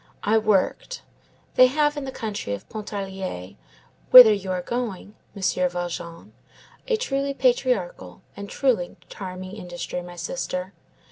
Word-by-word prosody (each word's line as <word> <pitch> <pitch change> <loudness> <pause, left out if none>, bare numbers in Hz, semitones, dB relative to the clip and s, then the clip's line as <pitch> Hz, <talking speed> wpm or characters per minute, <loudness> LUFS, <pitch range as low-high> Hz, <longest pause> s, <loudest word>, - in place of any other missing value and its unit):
I 220 +2 +3
worked. 215 - 0 0.5
They 255 - +7
have, 295 +2 +1
in 290 -2 -4
the 265 - -5
country 205 - -4
of 100 - -13
Pontarlier, 195 - -6 0.5
whither 245 -4 +11
you 195 -2 -3
are 180 -1 -2
going, 225 -3 -4 0.2
Monsieur 185 -2 +1
Valjean, 175 -1 -6 0.5
a 465 -3 +2
truly 280 - -2
patriarchal - - 0
and 200 0 -8
truly 235 -10 0
charming 185 -1 -7
industry, 180 -2 -6
my 175 0 -10
sister. 180 0 -4
200 Hz, 130 wpm, -24 LUFS, 180-260 Hz, 0.5 s, whither